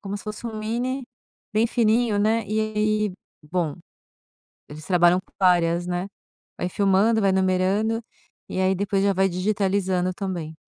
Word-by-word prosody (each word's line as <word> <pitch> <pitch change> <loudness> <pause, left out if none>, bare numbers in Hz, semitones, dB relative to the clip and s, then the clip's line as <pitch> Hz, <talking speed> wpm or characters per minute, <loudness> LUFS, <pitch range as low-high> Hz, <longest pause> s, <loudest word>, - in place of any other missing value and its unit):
como 200 0 -5
se 200 - -10
fosse 215 +2 -6
um 220 -1 -5
mini, 245 +5 -2 0.5
bem 220 +2 +3
fininho, 230 -1 +2
né, 215 +1 +1
e 215 +2 0
aí, 215 -1 0 0.3
bom, 155 -1 -2 0.9
eles 150 +1 -11
trabalham 180 0 +4
com - - -32
várias, 175 -2 +3
né, 180 +1 -2 0.5
vai - - -2
filmando, 200 +4 +3
vai 200 - +3
enumerando, 190 +4 +1 0.5
e - - -4
aí 190 0 +2
depois 195 0 0
já 200 - +3
vai 190 +1 +2
digitalizando 190 -1 0
também. 175 -5 -5
195 Hz, 150 wpm, -24 LUFS, 180-215 Hz, 0.9 s, trabalham